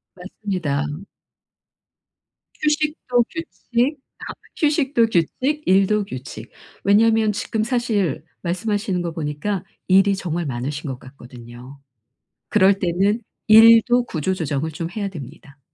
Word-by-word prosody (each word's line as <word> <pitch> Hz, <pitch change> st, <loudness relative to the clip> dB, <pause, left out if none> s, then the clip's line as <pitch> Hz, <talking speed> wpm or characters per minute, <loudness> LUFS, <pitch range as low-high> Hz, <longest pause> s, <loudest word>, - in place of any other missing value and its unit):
맞습니다. 180 Hz, -6 st, -3 dB, 1.8 s
휴식도 300 Hz, -5 st, +1 dB
규칙 285 Hz, -4 st, -2 dB, 0.2 s
다 -, -, -8 dB, 0.3 s
휴식도 290 Hz, -6 st, +2 dB
규칙, 255 Hz, -, 0 dB
일도 195 Hz, +2 st, +3 dB
규칙 125 Hz, -, -9 dB, 0.3 s
왜냐하면 220 Hz, +2 st, +4 dB
지금 210 Hz, +2 st, -2 dB
사실 220 Hz, -, -1 dB, 0.2 s
말씀하시는 195 Hz, +1 st, -2 dB
거 170 Hz, -1 st, -3 dB
보니까 160 Hz, +5 st, -3 dB, 0.2 s
일이 195 Hz, +1 st, +4 dB
정말 175 Hz, -3 st, -3 dB
많으신 140 Hz, +3 st, -4 dB
것 130 Hz, -2 st, -6 dB
같거든요. 125 Hz, 0 st, -13 dB, 0.7 s
그럴 195 Hz, -2 st, +4 dB
때는 195 Hz, +4 st, +1 dB, 0.3 s
일도 230 Hz, +3 st, +7 dB
구조조정을 160 Hz, -, -2 dB
좀 165 Hz, +2 st, -5 dB
해야 200 Hz, +2 st, -3 dB
됩니다. 145 Hz, -3 st, -11 dB
195 Hz, 250 characters per minute, -21 LUFS, 150-225 Hz, 1.8 s, 일도